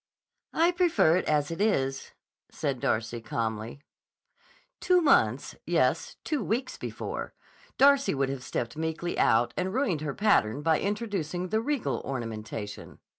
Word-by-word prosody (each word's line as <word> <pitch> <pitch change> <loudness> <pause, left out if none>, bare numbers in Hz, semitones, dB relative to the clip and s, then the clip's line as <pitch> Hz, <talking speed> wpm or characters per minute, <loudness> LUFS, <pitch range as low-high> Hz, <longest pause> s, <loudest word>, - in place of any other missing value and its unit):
"I 335 +2 +4
prefer 340 - +3
it - - -1
as 150 0 +1
it 165 - -4
is," 135 -11 0 0.4
said 140 -4 -3
Darcy 110 +1 -1
calmly. 115 +3 -4 1.0
Two 360 0 +4
months—yes, 325 - +1
two 300 -3 -1
weeks 250 +4 -2
before—Darcy 275 - 0
would 135 0 0
have 135 -1 -4
stepped 120 -2 -3
meekly 160 +2 -3
out 120 +1 +3
and 190 +3 -2
ruined 235 - 0
her 150 -3 -3
pattern 150 - +2
by 160 0 +3
introducing 195 -5 -2
the 220 +3 +1
Riegel 285 0 -1
ornamentation. 110 -5 -6
160 Hz, 125 wpm, -28 LUFS, -, 1.0 s, I